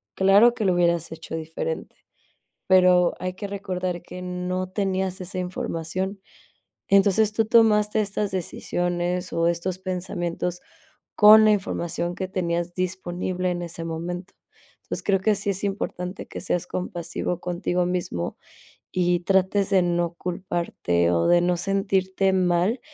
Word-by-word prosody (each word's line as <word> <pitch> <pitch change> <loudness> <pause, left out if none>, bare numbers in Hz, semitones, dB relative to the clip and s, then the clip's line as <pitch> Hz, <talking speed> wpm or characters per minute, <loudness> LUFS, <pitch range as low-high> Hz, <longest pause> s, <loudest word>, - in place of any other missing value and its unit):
claro 200 +5 +6
que 215 - -2
lo 185 - +3
hubieras 170 -2 +1
hecho 160 0 -7
diferente, 160 - -5 0.7
pero, 180 -2 +5
hay 185 0 -3
que 205 +1 -5
recordar 185 -3 -3
que 180 +1 -9
no 180 0 -3
tenías 190 -1 -1
esa 185 +1 -6
información. 180 +2 -3 0.7
Entonces, 200 +2 +4
tú 225 +1 +1
tomaste 215 -1 +4
estas 205 0 -2
decisiones, 175 0 -2
o 165 0 +2
estos 170 +2 -1
pensamientos, 180 -1 -3 0.5
con 215 +1 +9
la 215 - +6
información 175 -4 -1
que 190 - -3
tenías 175 -2 -2
disponible 185 0 -2
en 175 0 -3
ese 170 -1 -6
momento. 175 +3 -5 0.5
Entonces - - -5
creo, 195 -2 +2
que 215 +2 +3
sí 200 0 -2
es 195 +1 -3
importante 195 -2 -4
que - - -7
seas 180 0 -1
compasivo 175 -1 -3
contigo 180 0 -1
mísmo, 175 - -3 0.5
y 175 -1 +1
trates 190 +2 +2
de 195 -2 +4
no 175 -1 0
culparte, 170 - -1
o 85 -1 +2
de 175 0 +5
no 180 0 +1
sentirte 195 0 +1
mal, 185 +5 +2
180 Hz, 140 wpm, -24 LUFS, 175-195 Hz, 0.7 s, con